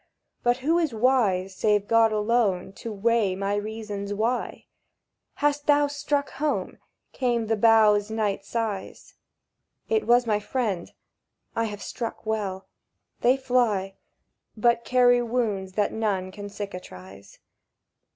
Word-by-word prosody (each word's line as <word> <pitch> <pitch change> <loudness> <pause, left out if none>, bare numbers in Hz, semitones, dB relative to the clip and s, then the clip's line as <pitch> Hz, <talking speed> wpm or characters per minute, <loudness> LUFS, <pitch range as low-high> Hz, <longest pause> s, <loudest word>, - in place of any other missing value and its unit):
"But 245 0 +2
who 330 +3 +3
is 310 -9 -1
wise, 215 -6 +2
Save 210 0 +1
God 230 -1 +4
alone, 210 -4 +1
to 230 - -7
weigh 215 -2 +1
my 195 +1 -2
reasons 205 -1 -4
why?" 230 +4 -2 0.7
—"Hast 290 0 0
thou 290 0 +5
struck 285 0 -2
home?" 300 +1 -2 0.3
came 240 -3 0
with 220 - -5
the 225 - +3
boughs' 215 -1 +5
night 210 -3 -1
sighs. 210 -2 -4 0.8
It 445 -2 +1
was 240 +1 +5
my 210 -2 +1
friend. 210 -5 -2 0.6
"I 230 - +1
have 205 -2 -6
struck 230 -1 -5
well. 200 -3 -2 0.5
They 250 +3 +3
fly, 240 -7 +1 0.6
But 235 +1 +2
carry 245 -1 +4
wounds 220 -6 -2
that 205 +1 0
none 200 -4 -1
can 205 +1 -8
cicatrize." 100 - -9
220 Hz, 130 wpm, -25 LUFS, 200-245 Hz, 0.8 s, thou